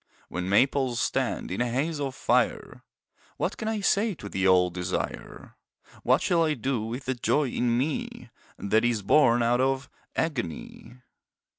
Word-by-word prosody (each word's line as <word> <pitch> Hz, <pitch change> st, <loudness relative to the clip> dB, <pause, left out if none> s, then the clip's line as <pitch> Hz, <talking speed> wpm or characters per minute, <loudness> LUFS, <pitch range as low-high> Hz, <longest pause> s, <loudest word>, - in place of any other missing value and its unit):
When 90 Hz, +2 st, -4 dB
maples 130 Hz, +3 st, +2 dB
stand -, -, -1 dB
in 95 Hz, -, -2 dB
a 120 Hz, -, 0 dB
haze 145 Hz, +6 st, -1 dB
of 135 Hz, -2 st, -3 dB
fire -, -, 0 dB, 0.5 s
What -, -, -1 dB
can 220 Hz, -, -5 dB
I 220 Hz, -1 st, -1 dB
say 200 Hz, +1 st, +1 dB
to 105 Hz, -, -9 dB
the 95 Hz, -1 st, 0 dB
old 90 Hz, -1 st, +4 dB
desire, 90 Hz, 0 st, -5 dB, 0.4 s
What -, -, +2 dB
shall 170 Hz, -2 st, +2 dB
I 155 Hz, -2 st, +1 dB
do 130 Hz, -1 st, -2 dB
with 115 Hz, +4 st, -5 dB
the 130 Hz, -, 0 dB
joy 135 Hz, +3 st, +1 dB
in 120 Hz, -1 st, 0 dB
me 140 Hz, +4 st, -3 dB, 0.3 s
That 110 Hz, +2 st, +1 dB
is 120 Hz, -4 st, 0 dB
born 120 Hz, 0 st, +4 dB
out 120 Hz, +2 st, +2 dB
of 135 Hz, +1 st, -1 dB, 0.2 s
agony? 120 Hz, -, -4 dB
125 Hz, 160 wpm, -27 LUFS, 110-145 Hz, 0.5 s, old